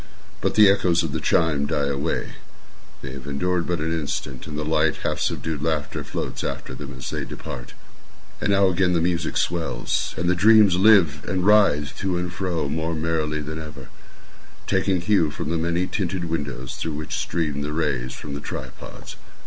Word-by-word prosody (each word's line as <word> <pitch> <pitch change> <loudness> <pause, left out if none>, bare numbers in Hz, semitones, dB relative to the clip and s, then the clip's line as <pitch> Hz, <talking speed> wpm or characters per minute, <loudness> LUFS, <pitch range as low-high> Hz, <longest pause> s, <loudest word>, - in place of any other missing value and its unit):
But - - 0
the 105 -1 +8
echoes 90 -3 +3
of 80 - -2
the - - -2
chime 75 -3 +2
die 70 - 0
away—they 70 -1 -6
have 70 0 -9
endured 85 +5 0
but 90 - 0
an 80 +2 -2
instant—and 75 -2 -4
a 75 - -1
light, 75 -1 +2
half - - -1
subdued 80 -3 -2
laughter 75 -2 -1
floats - - -4
after - - -4
them 70 +1 -7
as 65 - -6
they - - -2
depart. - - -8 0.7
And - - 0
now 100 -1 +5
again 90 0 +2
the 85 - +3
music 85 0 0
swells, 85 -1 -1
and 85 +1 -1
the 90 - +4
dreams 105 0 +6
live, 90 -8 +5
and 95 -1 0
writhe 100 -9 +4
to 95 -2 -1
and 90 0 -3
fro 90 -5 -1
more 80 +3 -2
merrily 80 -1 -1
than 80 +2 -5
ever, 75 -4 -10 0.8
taking 95 -1 +1
hue 85 -4 +3
from 80 +1 -4
the 85 - +1
many 85 +2 0
tinted 90 -2 -2
windows 70 -6 -4
through 80 -2 -3
which 75 0 -5
stream 75 -4 -1
the 75 +1 -3
rays 70 -6 -1
from 75 - -7
the 70 - -5
tripods. - - -8
80 Hz, 180 wpm, -24 LUFS, 75-90 Hz, 0.8 s, the